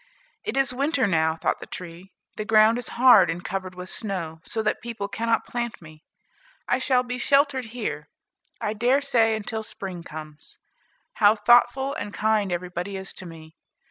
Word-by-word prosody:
"It - - -3
is 270 -2 +2
winter 280 +1 +1
now," 160 -4 +2
thought 160 - -1
the - - -9
tree, 180 +2 -9 0.2
"the 215 - -3
ground 220 +2 +4
is 245 - -6
hard 235 -8 +7
and 170 +2 -4
covered 185 -1 -4
with 180 0 -7
snow, 180 -7 -4
so 220 - -3
that 215 - -1
people 225 -4 -5
cannot 230 +2 0
plant 240 -2 -4
me. 155 -2 -15 0.6
I 250 - +1
shall 255 -1 +2
be 250 0 -5
sheltered 275 -1 +2
here, 205 -11 -5 0.5
I 210 - -2
dare 245 +6 +2
say, 230 -5 +3
until 220 +1 -4
spring 190 -4 -7
comes. 155 -1 -10 0.6
How 210 +1 +7
thoughtful 240 +5 +4
and 210 -8 -5
kind 215 -2 +1
everybody 180 +2 -4
is 190 0 -7
to 185 - -7
me! 160 -1 -12
215 Hz, 175 wpm, -25 LUFS, 180-245 Hz, 0.6 s, hard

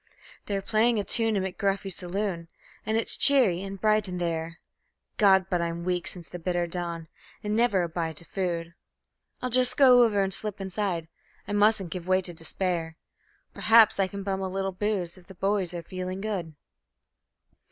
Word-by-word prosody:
They're 195 -1 -2
playing 225 +3 +2
a 205 - 0
tune 225 +1 +1
in 195 - 0
McGuffy's 195 0 -2
saloon, 180 -2 -3 0.4
and 220 +1 +1
it's 225 - +2
cheery 245 -11 +5
and 195 0 -7
bright 215 0 +2
in 180 - -4
there 165 -1 -3 0.6
(God! 190 -3 +5
but 180 -2 0
I'm 170 0 -3
weak 180 0 -2
since 175 -3 -4
the 175 - -8
bitter 175 0 -1
dawn, 170 -1 -5 0.4
and 210 0 -1
never 220 -6 +2
a - - -1
bite 165 -2 -4
of 170 - -14
food); 170 -3 -3 0.7
I'll 255 - -2
just 250 +1 +4
go 255 -3 +7
over 210 -4 +3
and 195 0 +2
slip 210 0 -1
inside 190 -3 -3 0.4
I - - -5
mustn't 205 -3 +2
give 180 0 -6
way 185 0 +2
to 175 - -6
despair 165 0 -3 0.6
Perhaps 225 -2 +5
I 195 - +3
can 200 +1 -7
bum 195 -1 -2
a 190 - -2
little 195 +1 -2
booze 185 -2 -3
if 175 - -21
the 190 - -13
boys 195 -1 -1
are 175 -1 -6
feeling 185 +2 -5
good. 190 -7 -4
190 Hz, 185 wpm, -27 LUFS, 175-210 Hz, 0.7 s, go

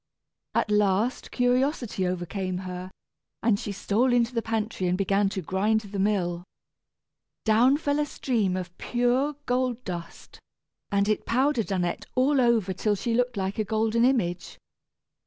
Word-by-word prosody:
At 210 - +1
last 210 +3 +1
curiosity 245 - +1
overcame 185 +1 -3
her, 180 0 -6 0.5
and 220 -3 +3
she 205 - -4
stole 210 +6 +1
into 240 0 +2
the 230 - 0
pantry 220 -4 -2
and 180 +1 +1
began 195 +1 +2
to 190 -2 -4
grind 210 +6 +1
the 200 -1 -6
mill. 180 -4 0 1.0
Down 235 +6 +5
fell 290 -1 0
a 300 - +2
stream 215 -10 0
of 180 -1 -6
pure 245 +4 +1
gold 250 -1 0
dust, 170 -3 -8 0.5
and 200 0 +2
it 215 - 0
powdered 250 -3 +1
Annette 180 -2 -1
all 265 +2 +3
over 225 -6 +2
till 205 +3 0
she 230 +4 -2
looked 245 -1 +1
like 195 +2 -2
a - - +2
golden 220 +2 +1
image. 185 -9 0
215 Hz, 150 wpm, -26 LUFS, 190-245 Hz, 1.0 s, Down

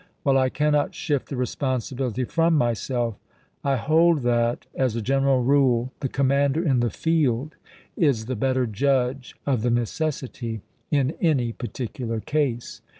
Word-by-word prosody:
While 135 -1 +4
I 130 0 +2
cannot 150 +1 +1
shift 145 -3 -2
the 140 - -4
responsibility 130 0 -2
from 165 +5 +2
myself, 120 -3 0 0.4
I 140 -1 +2
hold 160 +4 +3
that, 120 0 +1
as 130 -4 0
a 115 - -1
general 135 0 +2
rule, 130 -2 +3
the 135 - -2
commander 140 +4 +2
in 135 -5 +3
the 120 0 +1
field 150 -2 0 0.4
is 135 -9 +2
the 130 +2 -3
better 130 +2 +1
judge 125 +3 0
of 130 -6 +1
the 120 - +1
necessity 120 -2 -2 0.3
in 140 -2 +2
any 135 -9 +2
particular 120 -1 -4
case. 130 -2 -2
130 Hz, 145 wpm, -24 LUFS, 120-140 Hz, 0.4 s, While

